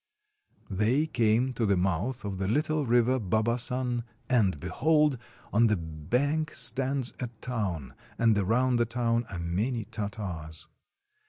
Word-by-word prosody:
They 110 Hz, +10 st, +2 dB
came 120 Hz, -1 st, +2 dB
to 120 Hz, -, -2 dB
the 100 Hz, -3 st, +3 dB
mouth 95 Hz, +7 st, -1 dB
of 95 Hz, -2 st, -4 dB
the 95 Hz, -, -1 dB
little 150 Hz, +4 st, +1 dB
river 120 Hz, +2 st, +3 dB
Babasan, 120 Hz, +4 st, 0 dB, 0.3 s
and 100 Hz, -, +3 dB
behold! 150 Hz, -, +2 dB, 0.3 s
on 115 Hz, +3 st, +5 dB
the 110 Hz, -2 st, +2 dB
bank 125 Hz, -, -1 dB
stands 135 Hz, -1 st, 0 dB
a 125 Hz, -, -2 dB
town, 100 Hz, -, -3 dB, 0.2 s
and 115 Hz, -2 st, +4 dB
around 120 Hz, +6 st, +2 dB
the 120 Hz, -, +3 dB
town 115 Hz, 0 st, 0 dB
are 95 Hz, -, -5 dB
many 105 Hz, +8 st, -1 dB
Tartars. 100 Hz, -8 st, -5 dB
115 Hz, 135 wpm, -28 LUFS, 100-130 Hz, 0.3 s, on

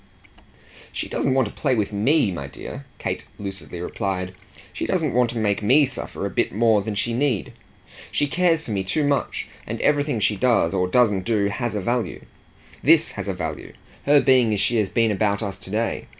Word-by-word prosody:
"She -, -, -4 dB
doesn't 130 Hz, -, 0 dB
want 130 Hz, -4 st, +3 dB
to -, -, -9 dB
play 135 Hz, -4 st, 0 dB
with 105 Hz, -2 st, -1 dB
ME, 115 Hz, +2 st, +2 dB
my 85 Hz, -, -5 dB
dear," -, -, -9 dB
Kate -, -, -3 dB
lucidly 95 Hz, -5 st, -7 dB
replied; 95 Hz, 0 st, -3 dB, 0.4 s
"she -, -, -3 dB
doesn't 165 Hz, -7 st, 0 dB
want 125 Hz, 0 st, +3 dB
to 115 Hz, -, -5 dB
make 105 Hz, -2 st, 0 dB
me 135 Hz, +8 st, +5 dB
suffer 135 Hz, -, -6 dB
a -, -, -1 dB
bit -, -, 0 dB
more 110 Hz, 0 st, +3 dB
than 105 Hz, +1 st, -4 dB
she 115 Hz, +3 st, -1 dB
need. 125 Hz, -4 st, 0 dB, 0.6 s
She 145 Hz, -, +1 dB
cares 165 Hz, +1 st, +1 dB
for 115 Hz, -, -7 dB
me 100 Hz, -2 st, -1 dB
too 100 Hz, +11 st, 0 dB
much, 145 Hz, -1 st, -1 dB, 0.2 s
and -, -, -4 dB
everything 145 Hz, -4 st, +2 dB
she 105 Hz, 0 st, +1 dB
does 120 Hz, -7 st, +2 dB
or 90 Hz, -1 st, +1 dB
doesn't 105 Hz, -2 st, +2 dB
do 105 Hz, -3 st, +1 dB
has 120 Hz, +1 st, -3 dB
a 105 Hz, -, -1 dB
value. 120 Hz, +4 st, -2 dB, 0.6 s
THIS -, -, +5 dB
has -, -, -6 dB
a -, -, -1 dB
value -, -, -5 dB, 0.3 s
her 145 Hz, 0 st, +7 dB
being 130 Hz, -5 st, +4 dB
as 105 Hz, -, 0 dB
she 120 Hz, +4 st, +2 dB
has 105 Hz, -3 st, +1 dB
been 115 Hz, -2 st, +2 dB
about 100 Hz, +1 st, 0 dB
us 100 Hz, -2 st, -3 dB
to -, -, -12 dB
day. 110 Hz, +3 st, -2 dB
110 Hz, 205 wpm, -23 LUFS, 100-130 Hz, 0.6 s, her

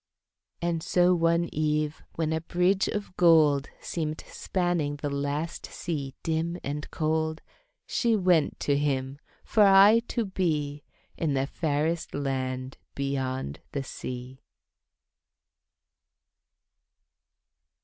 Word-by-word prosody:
And 170 Hz, -1 st, 0 dB
so 180 Hz, +2 st, +3 dB
one 170 Hz, 0 st, +2 dB
eve 150 Hz, 0 st, 0 dB
when 160 Hz, -1 st, 0 dB
a 160 Hz, -, -1 dB
bridge 180 Hz, +4 st, +2 dB
of 205 Hz, -3 st, -4 dB
gold 155 Hz, -5 st, +5 dB
Seemed 155 Hz, -2 st, -3 dB
spanning 175 Hz, -6 st, -1 dB
the 145 Hz, 0 st, -4 dB
last 145 Hz, +4 st, -3 dB
sea 140 Hz, -6 st, -4 dB
dim 165 Hz, +2 st, -1 dB
and 145 Hz, +2 st, -4 dB
cold, 160 Hz, 0 st, -1 dB, 0.4 s
She 235 Hz, -2 st, +1 dB
went 180 Hz, -6 st, +2 dB
to 145 Hz, -, +2 dB
him, 140 Hz, -1 st, -1 dB, 0.2 s
for 220 Hz, -, +2 dB
aye 200 Hz, +3 st, +7 dB
to 235 Hz, -, -1 dB
be 150 Hz, -7 st, -1 dB, 0.4 s
In 155 Hz, -4 st, 0 dB
the 135 Hz, 0 st, +1 dB
fairest 160 Hz, +3 st, -1 dB
land 130 Hz, -2 st, -3 dB, 0.2 s
beyond 130 Hz, -, -2 dB
the 140 Hz, -, -2 dB
sea. 125 Hz, 0 st, -7 dB
155 Hz, 110 wpm, -27 LUFS, 140-170 Hz, 0.4 s, aye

